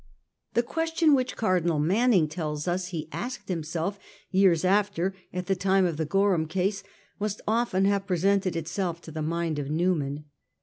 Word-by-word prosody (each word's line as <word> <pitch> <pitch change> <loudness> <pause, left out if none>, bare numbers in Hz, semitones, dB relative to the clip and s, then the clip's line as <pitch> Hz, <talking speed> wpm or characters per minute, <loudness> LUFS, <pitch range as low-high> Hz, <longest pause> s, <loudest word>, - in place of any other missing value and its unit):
The 235 - +4
question 325 +3 +2
which 255 -2 +1
Cardinal 175 -6 +1
Manning 190 +3 +3
tells 150 -1 -4
us 180 +1 -1
he 165 -4 -5
asked 240 -6 -5
himself 170 +3 -2 0.3
years 185 -3 +4
after 195 -1 +2 0.2
at 180 0 -4
the 195 +1 +1
time 190 +1 +2
of 170 -4 -1
the 160 -1 -1
Gorham 195 -3 +2
case, 190 +4 -1 0.4
must 210 0 -2
often 220 -4 +2
have 200 0 +1
presented 190 0 +1
itself 170 +1 -2
to 160 - -10
the 155 0 -4
mind 165 -1 -1
of 140 -1 -4
Newman. 150 -3 0
185 Hz, 165 wpm, -27 LUFS, 165-200 Hz, 0.4 s, The